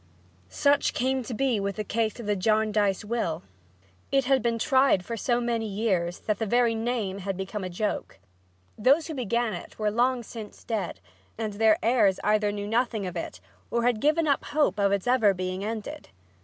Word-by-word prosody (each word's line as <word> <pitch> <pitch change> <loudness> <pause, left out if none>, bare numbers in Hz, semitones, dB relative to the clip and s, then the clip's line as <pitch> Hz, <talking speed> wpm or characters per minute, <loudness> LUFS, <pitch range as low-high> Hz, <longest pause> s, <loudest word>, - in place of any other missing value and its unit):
Such 285 - +2
came 260 +1 +1
to 245 0 -6
be 255 -3 +1
the 200 +2 -2
case 220 +1 -1
with 235 - -7
the 210 0 +1
Jarndyce 210 0 +1
will. 205 -8 -2 0.7
It 270 -1 +2
had 265 0 +3
been 230 0 0
tried 260 -7 +3
for 230 - -4
so 240 +2 0
many 235 -2 -1
years 195 -4 -1
that 215 -2 -1
the 225 - -1
very 240 +1 +3
name 225 -4 -2
had 195 -1 -4
become 195 +1 -4
a 185 - -3
joke. 205 +4 -3 0.6
Those 275 +8 +4
who 320 - -5
began 235 -3 -1
it 175 - -8
were 215 -1 0
long 245 +2 +1
since 220 -2 -10
dead 220 -4 -3 0.4
and 215 -2 -3
their 220 +1 +4
heirs 220 -5 +3
either 210 0 +2
knew 205 0 -4
nothing 225 -2 0
of 180 -1 -5
it 170 - -5 0.3
or 235 0 0
had 240 -3 +1
given 310 +2 +3
up 280 -2 +2
hope 295 -7 +1
of 200 -1 +3
its 200 -2 0
ever 225 -6 +4
being 185 +1 -3
ended. 220 0 -5
220 Hz, 190 wpm, -27 LUFS, 200-245 Hz, 0.7 s, Those